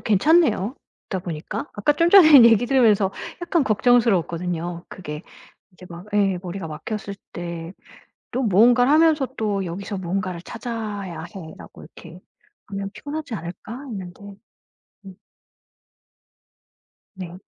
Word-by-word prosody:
괜찮네요 235 - +3 0.3
듣다 190 -2 -3
보니까. 160 -4 -5
아까 205 +9 +2
좀 335 +3 +2
전에 310 -10 +9
얘기 230 0 +5
들으면서 215 -7 +3 0.3
약간 340 -3 +1
걱정스러웠거든요 180 -7 +1
그게. 150 -3 -8 0.5
이제 180 0 -14
막 175 +3 -10
예 195 -3 +2
머리가 185 -1 -6
막혔을 200 +6 -6 0.2
때 170 -1 -6 0.6
또 255 - -1
무언가를 240 +4 +4
하면서 310 -3 +4
또 205 -3 -1
'여기서 195 +4 -5
무언가를 185 -1 -3
찾아야 210 -7 -6
해.'라고 160 -5 -11
이렇게 170 +2 -14 0.5
하면 195 -1 -5
피곤하지 290 -2 -6
않을까 175 +3 -8 0.2
했는데. 190 -6 -8 0.8
음. 190 -1 -11 2.0
네. 180 -2 -8
200 Hz, 280 characters per minute, -22 LUFS, 175-240 Hz, 2.0 s, 전에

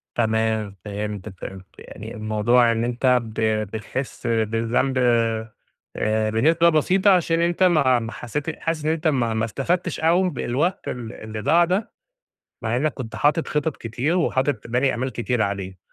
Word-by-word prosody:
تمام، 110 -3 0
فهمتك 105 -1 -5
فهمت، 95 -1 -8
يعني - - -9
الموضوع 110 +3 +2
إن 115 0 -1
أنت 125 +1 +2
ب 110 -1 -6
بتحسّ 110 +3 -2
بالذنب 115 +3 0 1.0
آآ، 110 0 0
بنسبة 165 +9 +3
بسيطة 185 +5 +3
عشان 170 -2 +3
أنت 170 +2 +1
ما 145 -9 +4
ما 115 0 -5
حسّيت 150 +6 -4
حاسس 165 -2 -2
إن 155 - +1
أنت 160 0 0
ما 120 -6 +1
ما 110 0 0
استفدتش 170 - -2
أوي 175 +3 +3
بالوقت 145 +9 -1
ال 120 -2 -5
اللي 110 0 -7
ضاع 170 +11 +4
ده، 185 +5 -1 0.7
مع 115 +1 0
إنّك 145 +2 0
كنت 115 -4 -7
حاطط 150 +3 +2
خِطَط 150 0 -1
كتير 125 +9 -2
وحاطط 130 -8 0
باني 125 +3 +1
آمال 130 +2 -2
كتيرة 120 0 0
عليه، 95 -2 -4
125 Hz, 155 wpm, -23 LUFS, 110-155 Hz, 1.0 s, ما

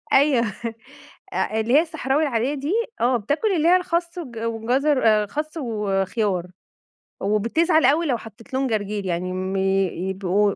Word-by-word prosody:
أيوه 270 -4 +4 0.9
أ 220 - 0
اللي 235 +4 +1
هي 300 - +8
الصحراوي 305 -3 -1
العادية 265 -1 0
دي، 290 +4 -3 0.3
آه، 245 +1 +3
بتاكل 290 - 0
اللي 315 +1 +2
هي 360 - +7
الخس 345 -1 -1
والج 250 -9 -7
والجزر 245 +5 0
آآ، 215 -1 +4
خس 305 +9 -5
وخيار، 205 - -1 0.8
وبتزعل 250 - +2
أوي 300 +6 +3
لو 250 -4 +1
حطيت 225 +3 -14
لهم 265 +1 +1
جرجير 210 -3 -2
يعني 180 0 -2
م 185 +1 -3
يبقوا 190 +1 +1
230 Hz, 150 wpm, -23 LUFS, 200-295 Hz, 0.9 s, هي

